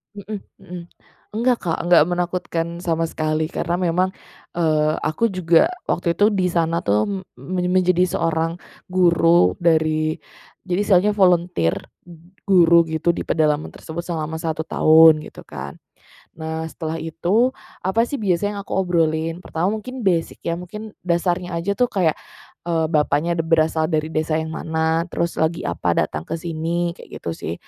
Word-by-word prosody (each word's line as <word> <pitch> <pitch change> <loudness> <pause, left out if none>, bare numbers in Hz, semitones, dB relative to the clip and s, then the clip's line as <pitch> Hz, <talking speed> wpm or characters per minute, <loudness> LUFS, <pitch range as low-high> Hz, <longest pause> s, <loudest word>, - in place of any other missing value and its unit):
Hmm 205 0 -7 0.2
hmm, 180 -2 -8 0.5
nggak 240 +3 +1
Kak, 170 -3 -1
nggak 170 -4 +7
menakutkan 175 -1 -2 0.2
sama 165 -1 0
sekali. 155 0 -1
Karena 175 +1 -2
memang, 185 +1 +1 0.4
eee 155 -2 +1
aku 210 +8 0
juga 175 - +3 0.2
waktu 170 -1 0
itu 205 - +6
di 185 -4 +1
sana 165 0 0
tuh 105 +1 +2
m 200 - -2 0.2
men 180 -1 -2
menjadi 180 -1 +3
seorang 165 -1 -1 0.3
guru 170 - +4
dari, 155 -2 +1 0.5
jadi 180 +1 0
istilahnya 205 +1 +3
volunteer, 175 - +2 0.2
ng 175 +2 -17
guru 170 -3 +5
gitu 165 +2 +1
di - - -3
pedalaman 155 -1 0
tersebut 165 +2 -7
selama 160 -2 -4
1 160 0 -3
tahun 160 -1 +6
gitu - - -12
kan. 70 +1 -8 0.6
Nah 160 0 -4
setelah 160 0 -5
itu, 200 +10 0 0.2
apa 190 +5 +1
sih 275 +4 -4
biasa 200 -1 0
yang 205 - -6
aku 200 - -5
obrolin? 165 -3 0
Pertama 185 +5 -2
mungkin 255 +3 -7
basic 175 -4 0
ya, 170 +1 -2
mungkin 210 +4 -8 0.2
dasarnya 175 0 0
aja 170 +4 -1
tuh 245 - +3
kayak, 180 -9 0 0.5
eee, 165 -2 +1
bapaknya 155 +2 +1
de 165 - +1
berasal 160 -1 +2
dari 155 -1 -1
desa 155 0 -1
yang 160 0 -2
mana, 160 +1 -1
terus 170 -1 -2
lagi 160 +1 0
apa - - -1
datang 80 0 -1
ke - - -2
sini, 170 +1 -2
kayak - - -11
gitu 85 - -2
sih. 80 0 -5
170 Hz, 160 wpm, -21 LUFS, 160-180 Hz, 0.6 s, nggak